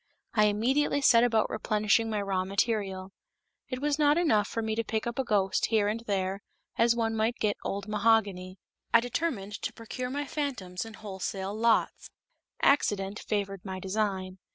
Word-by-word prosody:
I 215 -1 +4
immediately 255 +8 +2
set 235 -4 +6
about 225 -3 +2
replenishing 215 +1 +1
my 210 -2 -1
raw 190 -2 0
material. 195 -1 -1 0.6
It 255 0 -4
was 295 0 +1
not 295 +1 +4
enough 220 -12 +3
for 225 - -3
me 220 0 -1
to 230 +1 -1
pick 220 0 -2
up 235 +2 -4
a - - +2
ghost 200 -5 +1
here 215 -3 +2
and 215 +2 -1
there, 195 -1 -1 0.3
as 235 0 +3
one 225 -1 0
might 220 +2 +1
get 210 -2 0
old 200 +1 -3
mahogany; 205 -4 +1 0.3
I 230 - +7
determined 230 -5 -3
to - - -2
procure 250 +2 -5
my 285 +2 -3
phantoms 250 -12 -4
in 225 -1 -10
wholesale 195 -1 -5
lots. 225 +1 +1 0.5
Accident 205 -7 +2
favored 200 -3 -3
my 190 -1 -5
design. 190 -1 -2
215 Hz, 170 wpm, -29 LUFS, 195-235 Hz, 0.6 s, I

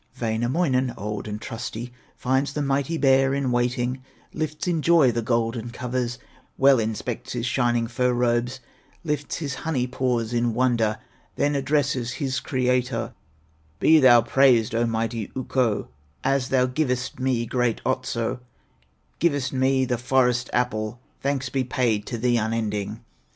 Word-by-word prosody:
Wainamoinen, 125 +3 0
old 105 +1 -4
and 105 0 -4
trusty, 115 +2 -6 0.2
Finds 130 +2 0
the 150 - -1
mighty 140 +3 0
bear 135 -1 +4
in 140 -2 0
waiting, 125 +1 0 0.3
Lifts 155 +1 -3
in 170 -3 +1
joy 160 -6 +5
the 120 0 -1
golden 115 0 -1
covers, 125 0 -3 0.4
Well 135 -2 +5
inspects 110 +2 -3
his 120 -1 -2
shining 120 -2 +1
fur 125 +2 0
robes; 120 +1 0 0.4
Lifts 150 -3 -2
his 145 -4 -3
honey 145 -6 0
paws 125 -3 -1
in 120 -1 +1
wonder, 115 -3 +2 0.4
Then 145 +1 +1
addresses 140 -3 0
his 130 -3 -2
Creator: 125 -1 -1 0.7
"Be 160 0 +6
thou 120 -4 +7
praised, 125 -5 +4
O 115 +1 +1
mighty 115 -1 -2
Ukko, 130 -4 0 0.3
As 135 -1 +1
thou 130 -1 +3
givest 130 -1 -2
me 130 -2 0
great 120 -1 0
Otso, 130 -2 -1 0.8
Givest 145 -5 +1
me 130 0 +2
the 125 -2 -1
Forest 125 -1 +2
apple, 110 -2 -1 0.2
Thanks 135 -2 -1
be 135 +1 0
paid 120 -5 0
to 120 - -3
thee 120 +1 +2
unending." 110 -1 -2
125 Hz, 140 wpm, -24 LUFS, 115-135 Hz, 0.8 s, thou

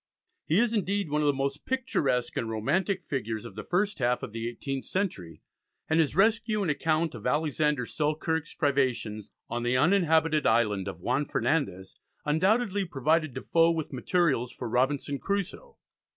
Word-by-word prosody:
He 160 - +2
is, 235 +1 +3
indeed, 200 -5 -1
one 150 0 +1
of 150 - +2
the - - +5
most 140 +1 -2
picturesque 140 - 0
and 115 - -2
romantic 170 - 0
figures 115 -5 -3
of 115 - -9
the 105 - -7
first 200 +2 0
half 125 -1 +1
of - - -5
the 115 +1 -3
eighteenth 135 +2 -5
century, 95 - -3 0.4
and 160 +1 +2
his 155 -2 +2
rescue 215 +1 +2
and 170 - +1
account 160 +1 0
of - - -5
Alexander 150 -3 +1
Selkirk's 155 +3 -2
privations 130 - 0 0.2
on 120 +1 -3
the 120 +1 +1
uninhabited 160 -2 +3
island 105 -4 +2
of 90 -3 -6
Juan 125 +8 +1
Fernandez 95 - -1 0.3
undoubtedly 195 +6 +2
provided 155 -2 0
Defoe 165 0 +3
with 160 -3 -2
materials 135 -3 +1
for 125 - -6
"Robinson 135 +4 0
Crusoe." 200 - -3
150 Hz, 160 wpm, -28 LUFS, 125-175 Hz, 0.4 s, the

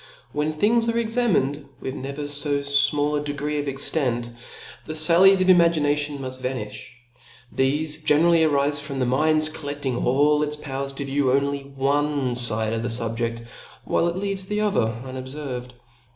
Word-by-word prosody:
When 150 +1 -1
things 225 +9 +2
are 230 - 0
examined 220 - 0 0.2
with 130 - -5
never 140 +2 -6
fo 145 0 -1
fmall 145 +1 +2
a - - -5
degree 145 +1 -3
of 145 - -4
extent^ 130 -3 -1 0.5
the 155 - -7
fallies 180 +5 +5
pf 185 - +2
imagination 150 -5 +3
inuft 130 -1 -6
vaniflii 110 -5 -5 0.7
thefQ 150 +3 0
generally 165 +3 +4
arifc 145 -2 +2
from 145 -2 -5
the 130 - 0
mind's 155 +4 +2
coUeding 145 -4 -4
all 145 +4 +3
its 150 0 -1
powers 140 -2 -4
.to 140 +1 -5
view 135 -1 +1
only 140 +1 -1
one 140 -1 0
fide 110 -2 +2
of 115 - -2
the 120 - -2
fubje(a^ 115 0 -2 0.4
while 170 - +1
it 170 - -2
leaves 195 0 -3
the 210 +1 -1
other 195 - +1
unobferved. 130 -1 -6
145 Hz, 155 wpm, -23 LUFS, 130-155 Hz, 0.7 s, fallies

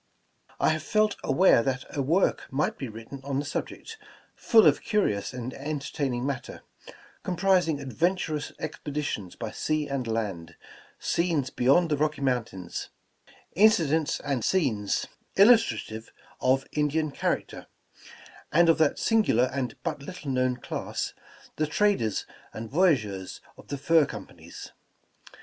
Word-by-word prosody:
I - - +3
have - - 0
felt 215 -1 +1
aware 150 -3 +5
that 130 +1 -2
a 140 - 0
work 165 +8 +1
might 140 +3 0
be 135 - -5
written 115 +5 -9
on 140 -1 -2
the 145 - -1
subject, 445 - -5 0.4
full 225 -2 +5
of - - +4
curious 150 - 0
and 125 0 -6
entertaining 140 -3 -3
matter, 140 -3 -5 0.6
comprising 180 -4 +1
adventurous 155 +2 -1
expe 155 -1 -6
ditions 125 -11 -3
by - - -5
sea 155 -1 -1
and 135 -3 -3
land, 95 -8 -3 0.4
scenes 165 -7 0
beyond 155 +7 +3
the 150 - +2
Rocky 150 0 0
Moun 125 -3 +1
tains, 90 -5 -7 0.7
incidents 160 -7 +3
and 140 -5 -2
scenes 120 - +1 0.3
illustrative 120 - +3 0.3
of 135 +1 +2
Indian 150 +1 0
charac - - -1
ter, - - -10 0.8
and 170 +2 +5
of 165 - +4
that 155 -3 +3
singular 210 - +2
and 130 -3 -2
but - - -3
little 150 -2 -6
known 130 -1 +1
class, - - -4 0.4
the 155 - +1
traders 160 - +1 0.3
and 110 0 -7
voyageurs 125 - +1 0.2
of - - -16
the 140 - -4
Fur 160 +2 +4
Companies. 85 -6 -10
140 Hz, 135 wpm, -27 LUFS, 125-165 Hz, 0.8 s, aware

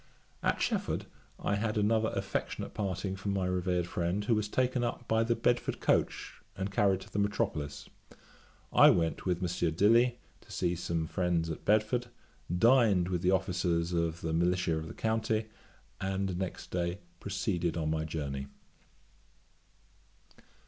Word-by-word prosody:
At - - +1
Shefford - - -1 0.3
I - - -1
had 105 +1 -1
another 110 +1 +2
affectionate - - -3
parting 95 -1 -2
from 100 +1 -3
my 95 -2 0
revered 90 -1 0
friend, 90 +4 -1
who 115 - +3
was 105 -1 +1
taken 125 +2 +1
up 120 0 -3
by 110 +1 +3
the 115 +1 +1
Bedford 120 +1 0
coach - - 0 0.2
and 95 +1 -3
carried 95 -1 +2
to - - -13
the 100 - 0
metropolis. 75 -8 -1 0.9
I - - +8
went 80 +2 +1
with 90 0 0
Messieurs 85 -2 0
Dilly, 120 +6 +4 0.2
to 110 - -17
see 90 -3 0
some 85 -1 -2
friends 85 -2 0
at 80 - -7
Bedford; 110 +4 +2 0.5
dined 110 -5 +4
with 90 -2 -1
the 90 - +2
officers 90 -2 +1
of 85 -1 0
the 80 0 -2
militia 85 0 +2
of 80 0 -4
the - - -9
county, 110 0 0 0.5
and 95 -1 -1
next 95 0 -5
day 85 0 -1 0.2
proceeded 95 -4 -1
on 80 -1 0
my 80 0 0
journey. 70 -4 -4
95 Hz, 150 wpm, -31 LUFS, 85-105 Hz, 0.9 s, I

